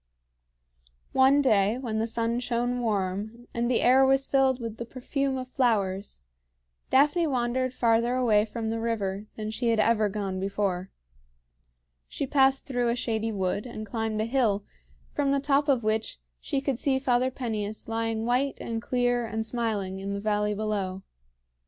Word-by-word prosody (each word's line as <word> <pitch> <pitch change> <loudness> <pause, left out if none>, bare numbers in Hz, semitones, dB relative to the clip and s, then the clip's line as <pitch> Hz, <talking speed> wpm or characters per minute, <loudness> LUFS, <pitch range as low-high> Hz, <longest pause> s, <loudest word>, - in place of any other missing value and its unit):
One 270 +2 +5
day 215 -3 +3
when 230 -4 -3
the 225 - 0
sun 230 +1 0
shone 245 0 -1
warm, 215 +1 -2
and 235 +1 0
the 250 - +2
air 260 +2 +6
was 270 0 +3
filled 265 -2 +3
with 230 -2 -5
the 235 - -4
perfume 265 +2 -2
of 255 -1 -5
flowers, 205 - 0 0.7
Daphne 295 +5 +4
wandered 255 -1 0
farther 235 0 +2
away 220 -5 +3
from 225 0 -4
the 225 - -2
river 210 -3 -2
than 215 0 -4
she 235 +2 -1
had 225 -1 +2
ever 215 -1 +3
gone 195 -2 -3
before. 195 -1 -2 1.2
She - - -3
passed 270 0 +3
through 245 -3 0
a 235 - +1
shady 225 -2 -1
wood 200 +2 -2
and 215 -3 -6
climbed 220 0 -2
a 215 - +1
hill, 230 -5 +1 0.5
from 285 -2 0
the 280 0 +2
top 280 +1 +2
of 260 -5 +2
which 215 - -1 0.2
she 270 - -2
could 270 -3 -1
see 275 -2 +2
Father 255 -1 +2
Peneus 220 -5 -4
lying 225 0 -1
white 255 +3 +1
and 225 -1 -4
clear 245 -1 0
and 220 0 -2
smiling 215 -5 -2
in 200 +1 -4
the - - -3
valley 210 0 0
below. 200 -3 -2
230 Hz, 165 wpm, -27 LUFS, 215-255 Hz, 1.2 s, air